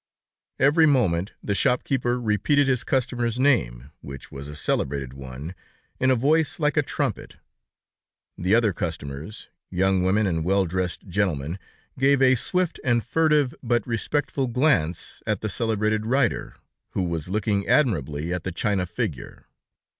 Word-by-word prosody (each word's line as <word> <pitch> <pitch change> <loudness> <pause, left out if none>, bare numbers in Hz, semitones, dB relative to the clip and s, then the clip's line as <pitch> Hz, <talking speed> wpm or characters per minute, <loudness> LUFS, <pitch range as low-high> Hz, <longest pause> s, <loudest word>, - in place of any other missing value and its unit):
Every 155 +4 +5
moment, 100 - +1
the 100 - -1
shop 125 +4 +2
keeper 125 -2 0
repeated 125 +6 +2
his 130 -2 +1
customer's 120 -3 -1
name, 70 - +1
which 70 -1 -10
was 70 +1 -8
a 75 - -8
celebrated 70 -3 -2
one, 65 +5 -8 0.5
in 130 - +2
a 130 - +5
voice 150 +7 +1
like 150 -1 +1
a 150 - +4
trumpet. 140 - -3 1.0
The 90 +5 +2
other 115 -4 +3
customers, 80 +2 -6 0.2
young 95 +1 +1
women 100 +4 +2
and 80 -4 0
well 95 +3 +2
dressed 90 +2 -3
gentlemen, 85 -3 -1 0.4
gave 135 +1 +4
a 130 -1 +5
swift 180 +7 0
and 120 -2 +2
furtive, 150 -5 +2
but 120 -3 0
respectful 135 +3 -1
glance 115 - 0
at 105 -3 0
the 110 - -2
celebrated 110 -1 0
writer, 125 -2 0 0.4
who 95 - 0
was 85 -2 -3
looking 100 0 0
admiringly 85 - +1
at 90 -1 -3
the 95 - -3
china 95 +1 -1
figure. 85 - -5
105 Hz, 145 wpm, -24 LUFS, 85-130 Hz, 1.0 s, Every